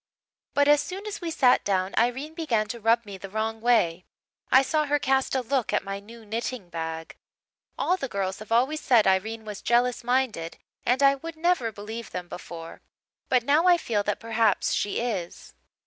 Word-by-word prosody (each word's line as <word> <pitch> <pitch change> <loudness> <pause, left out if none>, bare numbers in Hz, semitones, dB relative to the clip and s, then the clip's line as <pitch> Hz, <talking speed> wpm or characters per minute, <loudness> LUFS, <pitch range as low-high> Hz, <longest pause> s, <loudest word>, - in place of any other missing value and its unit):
"But 285 0 +4
as 295 0 +6
soon 385 +3 -6
as 420 -2 -5
we 340 - -3
sat 265 -6 +4
down 190 -1 0
Irene 255 +7 0
began 245 -11 0
to 235 - -5
rub 230 +1 +2
me 200 -2 -9
the 195 - -8
wrong 220 +2 -3
way. 185 -8 +2 0.4
I 260 +1 +7
saw 305 +2 +1
her 295 +1 +2
cast 270 -1 +1
a 260 - +2
look 255 0 0
at - - +1
my 195 0 -5
new 225 +2 -14
knitting 225 -2 -4
bag. 160 -1 -5 0.6
All 365 - +1
the 275 - -3
girls 195 -3 -3
have 215 +1 -11
always 265 +7 +2
said 235 -4 +4
Irene 220 +4 +1
was 210 -2 -7
jealous 240 +1 +2
minded 245 -9 -1 0.3
and 255 +3 +3
I 275 0 +7
would 325 +4 -7
never 315 -9 +1
believe 220 +3 -7
them 180 -1 -6
before. 165 -2 -9 0.5
But 250 -2 +3
now 300 +7 +3
I 355 -1 +7
feel 220 -10 -1
that 205 0 -2
perhaps 225 -2 +1
she 205 - -1
is. 210 -8 -4
230 Hz, 195 wpm, -26 LUFS, 205-270 Hz, 0.6 s, I